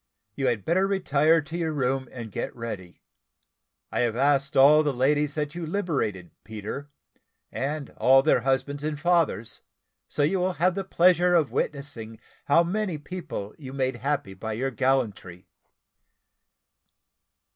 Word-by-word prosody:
You 135 +4 -1
had 115 -5 -1
better 185 +4 +2
retire 165 -4 +3
to 145 +3 -9
your 165 -2 -1
room 135 -2 -1
and 115 -4 -8
get - - -4
ready. 105 -7 -7 0.9
I - - -2
have 120 -2 +1
asked 140 +1 +1
all 145 +3 +7
the 150 -2 +1
ladies 145 +3 +1
that 150 -1 -2
you 175 - -5
liberated, 155 - -2
Peter, 110 +7 -7 0.6
and 145 +1 -3
all 135 +1 +5
their 155 - +4
husbands 135 +2 -1
and 150 -1 -3
fathers, 165 -9 0 0.5
so 145 - -1
you 185 +6 +2
will 185 +1 0
have 180 +2 +2
the 195 +1 -3
pleasure 180 -1 +4
of 160 -5 +2
witnessing 120 -6 -4 0.3
how 165 +4 +5
many 185 -1 -2
people 150 - -6
you 135 -3 -9
made 130 -2 -1
happy 140 -6 -2
by 110 +4 -5
your 130 +5 -2
gallantry. 115 -9 -1
140 Hz, 145 wpm, -26 LUFS, 125-165 Hz, 0.9 s, all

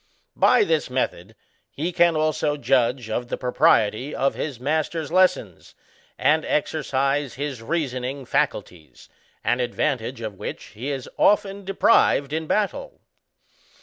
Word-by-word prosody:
By - - +4
this 475 +3 0
method, - - -3 0.3
he 165 +5 -3
can 170 -1 +3
also 155 -1 0
judge 125 -3 +1
of 120 +2 -3
the - - -3
propriety 125 +1 +2
of 135 - +1
his 140 -6 -5
master's 155 +3 -2
lessons, 180 - +1 0.4
and 155 +1 +2
exercise 140 -2 -1
his 140 -3 -4
reasoning 130 -1 -3
faculties, 85 -8 -3 0.3
an 125 - +1
advantage 125 0 -2
of 110 -4 -6
which - - -7
he 120 +7 -5
is 135 -3 -4
often 200 -1 +2
deprived 190 -7 +3
in 160 0 -2
battle. 215 - -2
140 Hz, 125 wpm, -23 LUFS, 125-160 Hz, 0.4 s, By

